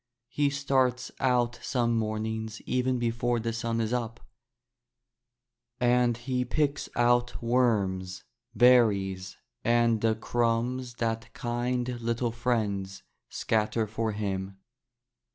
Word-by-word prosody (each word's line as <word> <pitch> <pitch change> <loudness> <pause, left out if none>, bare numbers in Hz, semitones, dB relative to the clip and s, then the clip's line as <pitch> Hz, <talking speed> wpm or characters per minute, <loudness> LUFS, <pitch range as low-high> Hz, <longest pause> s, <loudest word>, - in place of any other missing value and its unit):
He 145 +2 +1
starts 130 -3 0
out 125 -3 +1
some 120 -2 0
mornings 110 0 -2
even 125 0 0
before 120 0 0
the 115 0 -2
sun 115 0 -2
is 115 +1 -1
up, 115 -1 -2 1.6
and 120 -1 +3
he 125 +1 -1
picks 145 +3 -1
out 120 0 +2
worms, 100 -7 0 0.3
berries, 100 -6 +3 0.3
and 115 -2 +3
the 115 -1 +2
crumbs 120 +2 -1
that 115 -1 -2
kind 120 0 -2
little 115 +1 -1
friends 105 -5 -2 0.3
scatter 110 +1 0
for 110 +1 -2
him. 95 -2 -3
115 Hz, 105 wpm, -28 LUFS, 110-125 Hz, 1.6 s, and